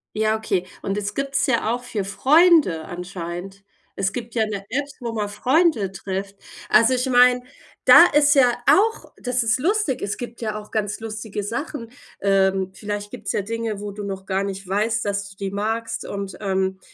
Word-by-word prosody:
Ja, 215 0 +2
okay. 190 -4 -1 0.2
Und 195 +1 -2
es 205 0 -3
gibt's 275 0 0
ja 235 -2 +1
auch 245 0 -4
für 215 -5 -3
Freunde 275 - +4
anscheinend. 180 +1 -7 0.3
Es 195 0 -1
gibt 240 -1 -6
ja 220 - +3
'ne 200 -2 -5
App, 280 +4 -1
wo 235 -2 -4
man 210 -2 -2
Freunde 255 - +2
trifft. 195 +1 -5 0.3
Also, 230 +4 +5
ich 250 +1 0
meine, 250 0 +5 0.4
da 340 - +10
ist 295 0 +4
ja 250 -3 +5
auch 445 +3 +3
das 250 -1 -1
ist 225 +2 +1
lustig. 375 - 0
Es 200 - -3
gibt 240 -1 -8
ja 215 -1 -2
auch 210 - -13
ganz 210 -1 -2
lustige 215 -1 -5
Sachen. 235 +2 -5 0.3
Ähm, 190 -1 +2
vielleicht 205 0 -5
gibt's 215 -5 -5
ja - - 0
Dinge, 225 0 -4
wo 205 0 -5
du 205 +1 -7
noch 195 -1 -5
gar 195 0 -1
nicht 195 -1 -5
weißt, 220 +4 0
dass 200 0 -2
du - - -16
die 195 -1 -4
magst 220 +3 -3
und, 200 -1 -5
ähm, 190 -1 -1
215 Hz, 190 wpm, -22 LUFS, 195-245 Hz, 0.4 s, da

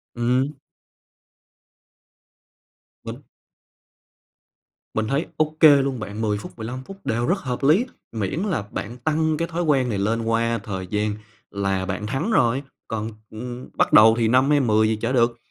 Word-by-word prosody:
Ừm. 125 +4 0 2.5
Mình - - -8 1.7
Mình 110 0 -1
thấy 140 +6 0
ô 155 0 0
kê 145 -3 +8
luôn 135 -3 -2
bạn, 105 +1 -6
10 105 -2 0
phút, 100 - -8
15 125 +4 -6
phút 195 +5 -11
đều 120 +2 0
rất 180 +5 +2
hợp 130 -5 -4
lý, 165 - +4 0.3
miễn 110 - -2
là 185 - -1
bạn 120 +4 -5
tăng 155 +3 0
cái 170 - -1
thói 175 +1 -2
quen 135 -6 +2
này 105 - -1
lên 110 +4 0
qua 115 0 0
thời 95 -4 -5
gian 105 +1 -1 0.4
là 95 -1 -1
bạn 100 +3 -4
thắng 145 - -2
rồi, 130 - +2 0.2
còn, 110 0 -3 0.2
ừm, 120 +3 -8
bắt - - +2
đầu 110 +1 +8
thì 115 - +2
5 130 +4 +3
hay 145 -1 +4
10 110 -4 +3
gì 110 - +1
chả - - 0
được. 120 -2 +2
120 Hz, 165 wpm, -23 LUFS, 110-140 Hz, 2.5 s, kê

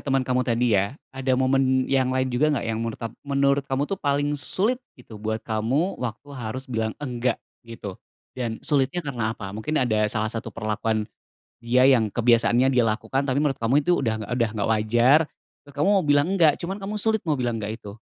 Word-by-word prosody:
temen 135 -2 +1
kamu 125 0 +1
tadi 120 -1 +1
ya 100 +7 +1 0.2
ada 130 -1 0
momen 130 0 +2
yang 130 -1 +1
lain 130 0 0
juga 145 +5 +2
enggak 145 -5 0
yang 115 -1 -2
menurut 115 -1 -3
tap 115 -1 -4
menurut 140 0 +1
kamu 135 0 0
tuh 195 +5 -4
paling 145 0 +1
sulit 215 - 0 0.2
gitu 115 -4 -13
buat 110 +1 -1
kamu 120 - -1
waktu 125 +3 -5
harus 130 0 -5
bilang 110 -4 -3
enggak 125 -4 -1 0.2
gitu, 115 -5 -9 0.3
dan 120 -3 -3
sulitnya 145 +4 +1
karena 115 -5 -2
apa? 95 -2 -7
Mungkin 110 +9 -3
ada 110 -5 +2
salah 110 +1 -1
satu 115 0 -4
perlakuan 110 0 -2 0.5
dia 125 +3 +4
yang 115 -6 +3
kebiasaannya 120 +2 +4
dia 125 -3 +3
lakukan 125 +5 -1
tapi 140 +1 +1
menurut 145 -3 0
kamu 125 +6 +2
itu 175 +4 +2
udah 110 -4 -2
udah 120 -2 +1
enggak 105 -1 -1
wajar, 120 +6 +4 0.5
terus 145 - -15
kamu 150 +8 +1
mau 185 - 0
bilang, 145 +1 +3
enggak 160 -4 +6
cuman 190 +3 -4
kamu 205 +1 -5
sulit 220 -1 +2
mau 155 - +2
bilang 120 -4 -1
enggak 110 +2 -5
itu. 100 +1 -10
125 Hz, 200 wpm, -24 LUFS, 115-140 Hz, 0.5 s, enggak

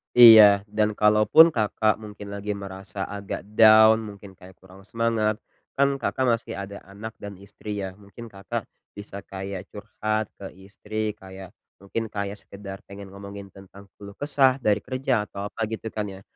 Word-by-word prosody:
Iya. 110 -4 +9
Dan 105 0 0
kalaupun 105 +9 +6
Kakak 110 -4 0
mungkin 105 -1 -10
lagi 100 +1 -4
merasa 95 0 -7
agak 100 -1 -6 0.2
down, 110 0 +8
mungkin 100 -3 -10
kayak 95 0 -15
kurang 95 +1 -17
semangat, 115 0 -1 0.3
kan 140 0 +2
Kakak 130 -1 -1
masih - - -6
ada 100 +1 -7
anak 105 +3 -10
dan 100 0 -8
istri 100 +1 -6
ya. 95 -1 -6
Mungkin 105 +3 -12
Kakak 95 -2 -6 0.2
bisa 100 -1 -8
kayak 95 0 -7
curhat 110 +1 -3
ke 95 - -9
istri, 105 +3 -5
kayak 95 -1 -11 0.3
mungkin 110 +3 -5
kayak 100 0 -4
sekedar 100 -1 -9
pengen 100 0 -11
ngomongin 100 0 -10
tentang 100 +1 -16
keluh 100 0 -11
kesah 135 0 +2
dari 105 -3 +2
kerja 130 -4 -1
atau 100 0 -7
apa 115 - -3
gitu 110 +1 -6
kan 105 -1 -4
ya. 95 -1 -9
105 Hz, 160 wpm, -24 LUFS, 100-110 Hz, 0.3 s, Iya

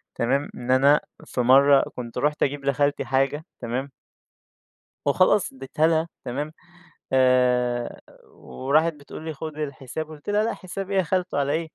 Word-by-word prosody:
تمام، 135 +5 0
إن 125 +1 -3
أنا 140 +3 +5 0.2
في 125 - -2
مرّة 135 +3 +6
كنت 120 -2 -7
رُحت 150 +1 +1
أجيب 140 0 -2
لخالتي 145 +1 +1
حاجة 135 +3 0 0.2
تمام؟ 125 +4 -3 1.2
وخلاص 185 +4 +3
ادّيتها 135 +4 0
لها 165 0 +1 0.2
تمام؟ 145 +5 -4 0.6
آآ 125 -2 +2 0.2
وراحت 155 +5 0
بتقول 150 +2 -11
لي: 160 - -4
"خُد 155 +1 -7
الحساب." 145 +1 -5
قُلت 155 +3 -12
لها: 210 +1 +2
"لأ 230 - -1
حساب 195 +1 -7
إيه 195 - +1
يا - - +4
خالته 180 -1 -1
علي 140 0 +1
إيه؟" 160 +1 -1
145 Hz, 155 wpm, -24 LUFS, 130-160 Hz, 1.2 s, مرّة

